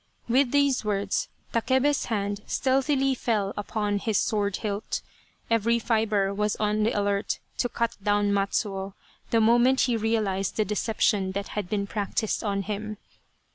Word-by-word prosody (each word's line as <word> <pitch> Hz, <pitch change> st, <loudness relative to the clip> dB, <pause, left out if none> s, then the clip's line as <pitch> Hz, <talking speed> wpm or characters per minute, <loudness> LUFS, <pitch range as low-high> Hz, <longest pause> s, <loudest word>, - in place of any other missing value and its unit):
With 255 Hz, +2 st, +3 dB
these 280 Hz, -2 st, +2 dB
words, 200 Hz, -2 st, -1 dB, 0.2 s
Takebe's 260 Hz, +5 st, +2 dB
hand 205 Hz, -2 st, -2 dB
stealthily 270 Hz, 0 st, +2 dB
fell 215 Hz, -6 st, -1 dB
upon 205 Hz, 0 st, -1 dB
his 215 Hz, -1 st, 0 dB
sword 205 Hz, -3 st, 0 dB
hilt. 205 Hz, -1 st, -3 dB, 0.4 s
Every 230 Hz, +1 st, +2 dB
fibre 215 Hz, -4 st, +1 dB
was 210 Hz, +1 st, 0 dB
on 210 Hz, 0 st, 0 dB
the 220 Hz, +2 st, +2 dB
alert 200 Hz, 0 st, 0 dB, 0.2 s
to 245 Hz, -, +1 dB
cut 235 Hz, -1 st, -2 dB
down 205 Hz, 0 st, +2 dB
Matsuo 195 Hz, -1 st, -1 dB, 0.3 s
the 230 Hz, -, +3 dB
moment 240 Hz, +4 st, +4 dB
he 245 Hz, -2 st, +2 dB
realized 210 Hz, -4 st, 0 dB
the 215 Hz, -, +2 dB
deception 205 Hz, -2 st, 0 dB
that 200 Hz, +1 st, -4 dB
had 205 Hz, -4 st, -4 dB
been 200 Hz, -2 st, 0 dB
practised 205 Hz, +2 st, -2 dB
on 200 Hz, -2 st, -1 dB
him. 215 Hz, +1 st, -4 dB
210 Hz, 145 wpm, -26 LUFS, 200-235 Hz, 0.4 s, moment